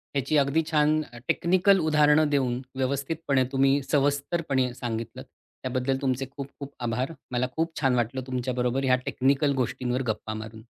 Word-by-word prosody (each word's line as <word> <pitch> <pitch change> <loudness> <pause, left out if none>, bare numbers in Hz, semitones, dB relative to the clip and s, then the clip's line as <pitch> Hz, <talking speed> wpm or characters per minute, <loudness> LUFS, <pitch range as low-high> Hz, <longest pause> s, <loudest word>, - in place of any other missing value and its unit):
याची 140 +2 +1
अगदी 140 +3 +3
छान 155 0 +3
अ, 120 - -10
टेक्निकल 185 +2 +3
उदाहरणं 150 -1 +4
देऊन 130 -3 0 0.2
व्यवस्थितपणे 140 +1 0
तुम्ही 135 +1 +3
सविस्तरपणे 140 -2 +1
सांगितलंत 115 +1 -5
त्याबद्दल 130 +1 -4
तुमचे 135 -1 0
खूप 140 -1 -4
खूप 140 0 -8
आभार. 125 +6 -1 0.2
मला 125 +1 0
खूप 165 0 -1
छान 130 -3 +3
वाटलं 120 +2 -1
तुमच्या 130 0 -2
बरोबर 125 +2 0
या 130 -1 +4
टेक्निकल 140 +2 +2
गोष्टींवर 125 0 -1
गप्पा 110 0 -2
मारून. 110 0 -8
135 Hz, 150 wpm, -26 LUFS, 125-145 Hz, 0.2 s, उदाहरणं